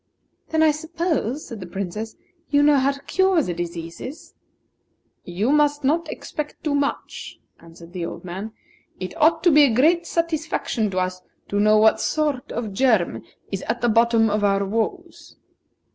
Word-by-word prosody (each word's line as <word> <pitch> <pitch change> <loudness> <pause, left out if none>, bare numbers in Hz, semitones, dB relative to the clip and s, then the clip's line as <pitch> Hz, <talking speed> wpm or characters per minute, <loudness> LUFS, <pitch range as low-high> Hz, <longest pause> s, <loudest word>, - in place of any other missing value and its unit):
"Then 320 0 +2
I 315 - +6
suppose," 315 - -2
said 230 - -8
the 185 - -8
Princess, 200 +4 -5 0.3
"you 285 0 +4
know 290 -1 +5
how 270 +1 +3
to 280 - -13
cure 380 -2 +2
the 180 - -3
diseases?" 170 - -7 0.9
"You 195 +9 -1
must 295 -1 +2
not 315 +5 +1
expect 300 -1 -6
too 300 - 0
much," 285 0 -3 0.2
answered 170 +1 -15
the 175 -3 -3
old - - -9
man. 190 +5 -6 0.5
"It 185 - -6
ought 315 +2 +4
to 350 - +6
be 300 0 +7
a 240 -5 +1
great 335 +7 +3
satisfaction 315 -9 -1
to 185 - -5
us 185 0 -1 0.3
to 205 - 0
know 215 +1 +5
what 220 +1 +4
sort 295 -3 -1
of 220 -4 -4
germ 200 - +2 0.3
is 195 -2 -3
at 235 +1 -2
the 240 - +2
bottom 230 0 +4
of 210 0 0
our 200 0 +2
woes." 220 +3 -4
235 Hz, 170 wpm, -23 LUFS, 195-300 Hz, 0.9 s, be